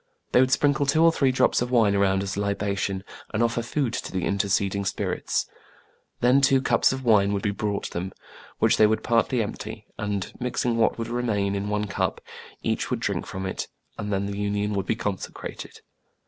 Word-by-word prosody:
They - - +5
would 130 0 +4
sprinkle 145 +1 +2
two 155 +3 +4
or 165 - +7
three 135 -5 +2
drops 130 - +2
of 125 - -1
wine 115 -5 +4
around 95 -1 +2
as 100 0 -3
a 100 - -1
libation, 100 -1 -1 0.3
and 110 +2 +1
offer 115 0 +1
food 125 +1 -1
to - - -4
the 95 -1 -1
interceding 100 0 +1
spirits. 100 - -1 0.8
Then 125 +3 +5
two 135 -1 +5
cups 130 - +3
of 130 0 -4
wine 100 -3 +4
would 100 - -2
be 100 - +1
brought 100 0 -3
them, 90 +2 -4 0.5
which - - +3
they 110 - +6
would 110 +1 0
partly 115 +1 +2
empty; 110 0 -7
and, 105 -2 -2
mixing 125 -1 0
what 115 -1 +2
would 115 -1 -3
remain 110 -5 0
in 100 +1 -2
one 105 0 0
cup, 100 - -1 0.4
each - - -1
would - - -1
drink - - -2
from 95 0 -5
it, 95 - -3 0.3
and 105 -1 -4
then 100 0 0
the 100 0 -4
union 105 0 -1
would 95 -2 -2
be - - +1
consecrated. 105 -3 -5
105 Hz, 200 wpm, -25 LUFS, 100-120 Hz, 0.8 s, or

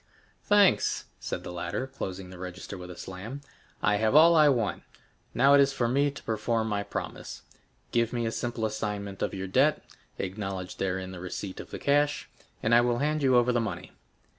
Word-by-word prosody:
"Thanks," 205 -2 +4
said - - -4
the - - -6
latter, 90 +8 -3
closing 95 -8 -6
the 90 - -11
register 90 +2 -7
with 90 -1 -9
a 90 - -9
slam, 105 +12 -7 0.4
"I 105 0 +3
have 110 +5 +1
all 165 +2 +8
I 155 -2 +7
want; 120 -6 0 0.5
now 135 +2 +5
it 140 - +7
is 135 0 +3
for 120 -3 0
me 140 +4 +2
to 140 - -10
perform 110 +1 -1
my 105 -2 -1
promise. 100 - -6 0.5
Give 115 -1 +1
me 120 -1 -1
a 115 - -1
simple 120 -1 -2
assignment 105 -2 -4
of - - -1
your 95 0 -4
debt; 130 +11 +2 0.3
acknowledge 95 -1 -4
therein 95 -1 -2
the 90 - -8
receipt 95 +2 -6
of - - -8
the - - -6
cash, 145 +1 +1 0.4
and 110 - +2
I 120 - +7
will 120 0 +1
hand 150 +3 0
you 130 -2 +4
over 120 0 +4
the 120 -1 +1
money." 110 - -5
115 Hz, 195 wpm, -28 LUFS, 95-135 Hz, 0.5 s, all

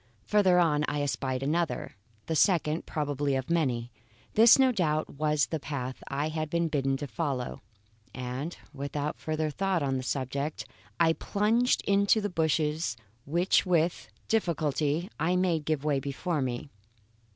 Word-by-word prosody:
Farther 195 -4 +4
on 155 -4 +3
I 145 -1 -1
espied 130 -2 -2
another 165 +3 -1 0.3
the 160 - -2
second, 160 -2 +2
probably, 145 -2 -1
of 130 +3 -3
many. 125 -8 0 0.4
This, 225 +2 +8
no 265 -1 +5
doubt, 155 -8 0
was 150 0 +1
the 160 - -3
path 130 -3 -5
I 145 +3 -1
had 155 0 -3
been 170 +1 0
bidden 135 -3 0
to 145 - -4
follow, 140 -4 -3 0.5
and 130 +6 -5 0.2
without 145 +1 -4
further 155 -1 -2
thought 190 -1 0
on 135 -1 0
the - - -2
subject, 140 +3 -3 0.3
I 165 -1 +5
plunged 220 +8 +1
into 200 +2 +3
the 205 -2 -2
bushes 160 -4 0 0.3
which 175 +6 +2
with 175 -2 +1 0.2
difficulty 160 -5 0
I 170 +4 +1
made 175 -4 +1
give 155 -2 -1
way 145 -2 +1
before 145 +4 -2
me. 130 +2 -3
155 Hz, 150 wpm, -29 LUFS, 140-170 Hz, 0.5 s, This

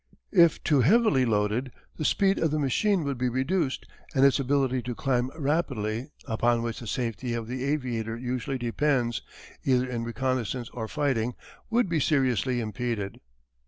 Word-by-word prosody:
If 170 -5 +5
too 145 -4 +3
heavily 165 - +4
loaded 110 +3 0 0.3
the 155 - -3
speed 195 +3 +3
of 165 - +2
the 155 - 0
machine 165 - +1
would 140 -3 -3
be 125 0 +1
reduced 135 +4 -1 0.3
and 135 0 +5
its 140 +1 +4
ability 135 -1 +1
to 125 0 -5
climb 125 -1 0
rapidly 135 -6 -1 0.2
upon 120 0 +1
which 115 -1 -3
the 120 - -8
safety 120 0 -2
of 115 -1 -3
the 125 +2 -4
aviator 120 -6 -2
usually 125 +2 -3
depends, 120 -1 0 0.4
either 130 -1 +2
in 120 -2 -3
reconnaissance 125 0 -2
or 110 -2 -5
fighting, 125 -4 0 0.3
would 235 -1 +2
be 170 -2 0
seriously 130 - +1
impeded. 110 -2 -3
130 Hz, 160 wpm, -27 LUFS, 120-140 Hz, 0.4 s, If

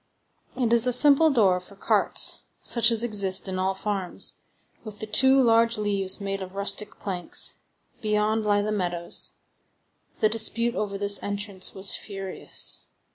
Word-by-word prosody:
It 240 -3 0
is 235 +1 +3
a 250 - +1
simple 290 +5 +5
door 200 -10 +2
for 185 +2 -15
carts, - - +1 0.2
such 235 -1 +1
as 230 -1 +2
exist 200 -5 0
in 185 -1 -4
all 190 +1 -1
farms, 195 -2 -4 0.5
with 215 -2 -10
the 215 - -7
two 265 +5 +3
large 230 -2 +2
leaves 200 -2 -1
made 195 -1 -5
of 190 0 -9
rustic 200 +1 -3
planks: 180 -3 -2 0.4
beyond 215 +1 -1
lie 205 -1 +1
the 215 - -3
meadows. 175 -4 -3 0.9
The 215 - +3
dispute 225 +2 +5
over 205 -4 -4
this 200 0 +3
entrance 200 -2 0
was 190 0 +2
furious. 195 -2 -3
205 Hz, 150 wpm, -24 LUFS, 195-225 Hz, 0.9 s, simple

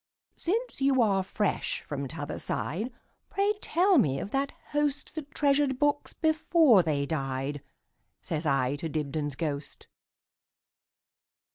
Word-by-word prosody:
"Since 450 - -2
you 270 -1 +3
are 195 -3 +2
fresh 195 +2 -1
from 140 -2 -4
t'other 145 +1 -5
side, 215 - -2 0.4
Pray 400 +1 +2
tell 360 +1 +4
me 135 - +2
of 200 - -5
that 275 +1 0 0.2
hostThat 295 0 -2
treasured 280 -2 +2
books 290 +1 +1
before 315 - +4
they 145 -4 0
died,"Says 140 +2 -5
I 135 0 +1
to 165 +1 -4
Dibdin's 145 -1 -2
ghost. 145 -1 -4
195 Hz, 115 wpm, -29 LUFS, -, 0.4 s, tell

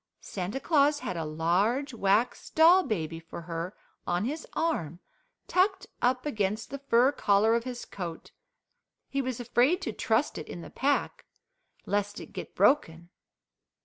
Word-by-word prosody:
Santa 195 +6 -4
Claus 290 -1 +3
had 185 - -3
a 165 - -2
large 185 - 0
wax 215 +2 +1
doll 335 +4 +6
baby 165 - -3
for 165 +1 -9
her 170 +2 -5 0.3
on 175 +4 0
his 300 +6 -4
arm, 175 - -1 0.5
tucked 380 +2 +2 0.2
up 250 +2 +1
against 215 -6 -2
the 280 - -5
fur 260 -1 +4
collar 210 -4 +3
of 235 +1 0
his 250 -1 -5
coat. 170 -4 -7 0.8
He 275 - 0
was 255 -2 -3
afraid 245 +8 +2
to - - -3
trust 225 - 0
it 155 - -8
in 175 - -7
the - - -10
pack, 285 +2 0 0.6
lest 205 0 -1
it - - -11
get - - -7
broken. 170 - +2
225 Hz, 150 wpm, -28 LUFS, 175-280 Hz, 0.8 s, doll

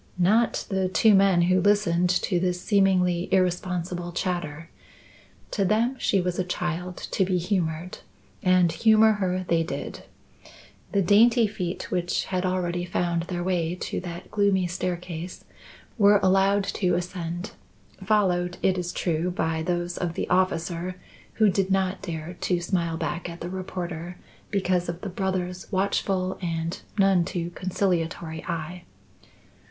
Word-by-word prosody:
Not 215 +6 +2
the 190 -2 0
two 215 +3 +4
men 195 -3 +5
who 185 +1 +3
listened 180 -3 +3
to 180 0 +1
this 180 0 0
seemingly 185 -3 +2
irresponsible 180 -1 0
chatter. 170 -4 -3 0.8
To 200 - 0
them 225 +7 +2
she 195 - +2
was 180 0 -1
a - - +2
child 180 0 -3
to 195 - +2
be 185 -1 +1
humoured 175 -2 -2 0.4
and 185 -2 +4
humour 220 +1 +5
her 185 0 0
they 170 -1 +2
did. 165 - -5 0.9
The 200 -1 +2
dainty 230 +5 +5
feet 185 -4 -4
which 175 -1 0
had 185 -1 -1
already 175 -1 -1
found 170 -1 -1
their 175 -1 -3
way 175 -2 0
to - - -4
that 175 -1 -8
gloomy 200 -3 +2
staircase 175 -1 -4 0.5
were 205 0 +6
allowed 195 +1 +4
to 180 -2 0
ascend, 175 +1 -4 0.5
followed 180 -3 +1
it 185 -1 +2
is 175 0 -3
true 170 0 -1
by 160 -2 -1
those 175 +1 -2
of 170 -2 -2
the - - -2
officer 180 -1 0 0.4
who 220 - +4
did 195 0 +1
not 190 0 0
dare 165 -1 -5
to 180 -2 +1
smile 170 -2 -1
back 170 +1 -3
at 170 0 -8
the 175 +1 -5
reporter 175 -2 -5 0.3
because 185 -3 0
of 170 +1 -5
the 200 - -4
brother's 185 -1 -3
watchful 190 -1 0
and 165 -1 -3 0.2
none 195 -3 +4
too 170 0 -4
conciliatory 170 -3 -2
eye. 170 +1 -4
180 Hz, 145 wpm, -25 LUFS, 175-190 Hz, 0.9 s, were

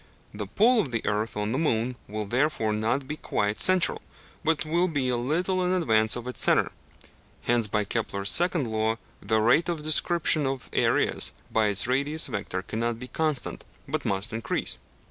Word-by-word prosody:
The 105 -1 -5
pull 230 - +3
of 150 - 0
the 115 -2 -3
earth 105 +1 -1
on 105 +1 -1
the 130 - 0
moon 125 -5 0
will 105 +1 -4
therefore 120 -1 0
not 115 +6 -1
be 150 - -4
quite 105 -6 -2
central, 185 -2 +4 0.4
but 160 0 +1
will 170 +4 +1
be 140 -6 -1
a 125 - +1
little 175 +10 0
in 180 - +1
advance 110 -12 +2
of 120 - -6
its 125 - -6
centre; - - +3 0.7
hence, 120 -2 +2
by 105 +1 0
Kepler's 100 -2 -2
second 170 -5 +2
law, 110 0 0 0.3
the 110 +2 +1
rate 125 +11 +3
of 165 -3 -3
description 155 -1 +3
of 135 -1 -4
areas - - +2 0.2
by 110 -1 +2
its 100 -1 +3
radius 140 +5 0
vector 100 -5 -3
cannot 115 +2 -2
be 125 +2 -9
constant, 155 -4 -2 0.2
but - - -2
must 100 +3 -2
increase 115 0 -2
(p. - - -28
125 Hz, 185 wpm, -26 LUFS, 110-155 Hz, 0.7 s, central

